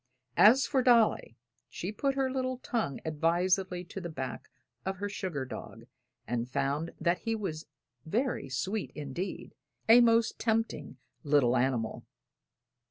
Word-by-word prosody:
As 250 Hz, +6 st, +7 dB
for 270 Hz, -3 st, +1 dB
Dolly, 235 Hz, -, +3 dB, 0.3 s
she 180 Hz, -, -5 dB
put 275 Hz, +5 st, -1 dB
her 265 Hz, -1 st, 0 dB
little 255 Hz, -1 st, -2 dB
tongue 225 Hz, -, -2 dB
advisedly 175 Hz, +4 st, +1 dB
to 190 Hz, +2 st, -8 dB
the 175 Hz, -, -5 dB
back 130 Hz, -5 st, -6 dB, 0.3 s
of 190 Hz, 0 st, -3 dB
her 205 Hz, +2 st, -3 dB
sugar 185 Hz, -9 st, -4 dB
dog 115 Hz, -2 st, -9 dB, 0.4 s
and 120 Hz, 0 st, -2 dB
found 140 Hz, +4 st, -1 dB
that 170 Hz, +1 st, +1 dB
he 225 Hz, 0 st, -2 dB
was 165 Hz, -8 st, -5 dB, 0.4 s
very 225 Hz, -, -1 dB
sweet 185 Hz, -, -2 dB
indeed 150 Hz, +6 st, -5 dB, 0.3 s
a 230 Hz, +2 st, +8 dB
most 230 Hz, -1 st, +3 dB
tempting 220 Hz, -, -1 dB, 0.3 s
little 140 Hz, -4 st, +3 dB
animal. 120 Hz, -3 st, 0 dB
180 Hz, 135 wpm, -30 LUFS, 140-225 Hz, 0.4 s, a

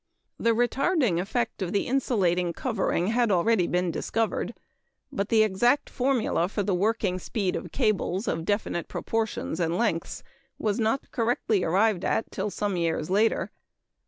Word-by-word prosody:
The 230 Hz, -1 st, +2 dB
retarding 245 Hz, -, +2 dB
effect 225 Hz, +3 st, -2 dB
of 180 Hz, -2 st, -2 dB
the 200 Hz, -, +1 dB
insulating 185 Hz, -10 st, +1 dB
covering 200 Hz, -6 st, -1 dB
had 235 Hz, 0 st, +2 dB
already 185 Hz, 0 st, +3 dB
been 180 Hz, 0 st, 0 dB
discovered; 225 Hz, +6 st, -2 dB, 0.6 s
but 200 Hz, +1 st, -2 dB
the 220 Hz, -1 st, +5 dB
exact 240 Hz, +7 st, +2 dB
formula 245 Hz, -9 st, +1 dB
for 205 Hz, 0 st, -2 dB
the 195 Hz, 0 st, 0 dB
working 195 Hz, -1 st, 0 dB
speed 190 Hz, -1 st, -2 dB
of -, -, -5 dB
cables 215 Hz, -4 st, 0 dB
of 165 Hz, -, -1 dB
definite 205 Hz, -3 st, -1 dB
proportions 220 Hz, -6 st, -2 dB
and 170 Hz, 0 st, 0 dB
lengths 210 Hz, -8 st, -1 dB, 0.3 s
was 210 Hz, -1 st, -1 dB
not 225 Hz, +4 st, 0 dB
correctly 225 Hz, -4 st, 0 dB
arrived 195 Hz, +2 st, +2 dB
at 225 Hz, -, 0 dB
till 200 Hz, +2 st, -2 dB
some 200 Hz, -2 st, -2 dB
years 165 Hz, 0 st, -1 dB
later. 215 Hz, +3 st, +2 dB
210 Hz, 150 wpm, -26 LUFS, 180-230 Hz, 0.6 s, the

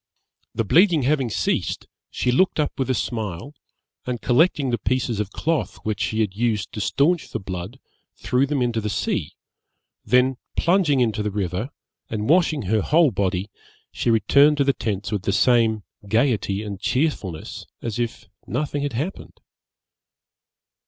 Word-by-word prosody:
The 115 Hz, -, +1 dB
bleeding 165 Hz, -, +4 dB
having 135 Hz, -2 st, +1 dB
ceased, 105 Hz, -, -1 dB, 0.2 s
she 125 Hz, -, 0 dB
looked 185 Hz, +6 st, +2 dB
up 150 Hz, -2 st, -1 dB
with 130 Hz, -, -1 dB
a 130 Hz, -, +2 dB
smile, 110 Hz, -, -4 dB, 0.5 s
and 125 Hz, -1 st, -2 dB
collecting 135 Hz, +1 st, +2 dB
the 120 Hz, -, 0 dB
pieces 125 Hz, -4 st, -1 dB
of 105 Hz, -2 st, -2 dB
cloth 160 Hz, +7 st, -1 dB
which 110 Hz, -2 st, -2 dB
she 110 Hz, 0 st, 0 dB
had 100 Hz, -3 st, -1 dB
used 110 Hz, -2 st, -1 dB
to 105 Hz, -, -5 dB
stanch 155 Hz, -, +1 dB
the -, -, -4 dB
blood, 95 Hz, +6 st, -6 dB, 0.4 s
threw 130 Hz, +2 st, +1 dB
them 140 Hz, -3 st, 0 dB
into 115 Hz, -2 st, 0 dB
the 105 Hz, -, -2 dB
sea; -, -, -2 dB, 0.7 s
then 125 Hz, +1 st, +3 dB, 0.2 s
plunging 170 Hz, -7 st, +3 dB
into 110 Hz, -3 st, +1 dB
the 105 Hz, -, -1 dB
river, 100 Hz, +3 st, -3 dB, 0.4 s
and 110 Hz, -1 st, -3 dB
washing 160 Hz, -4 st, +3 dB
her 105 Hz, +3 st, +1 dB
whole 155 Hz, -, +4 dB
body, 95 Hz, 0 st, -1 dB, 0.4 s
she -, -, -1 dB
returned 140 Hz, +6 st, +4 dB
to 140 Hz, -, +3 dB
the 140 Hz, 0 st, +2 dB
tents 105 Hz, -4 st, -3 dB
with 105 Hz, -3 st, -1 dB
the 100 Hz, -, -1 dB
same 110 Hz, -1 st, +3 dB, 0.2 s
gaiety 110 Hz, -3 st, +1 dB
and 100 Hz, -3 st, -6 dB
cheerfulness 115 Hz, -, -2 dB, 0.2 s
as 115 Hz, 0 st, -3 dB
if 120 Hz, -1 st, -3 dB, 0.2 s
nothing 145 Hz, -1 st, -2 dB
had 145 Hz, -2 st, -2 dB
happened. 150 Hz, +12 st, -5 dB
120 Hz, 160 wpm, -23 LUFS, 105-140 Hz, 0.7 s, bleeding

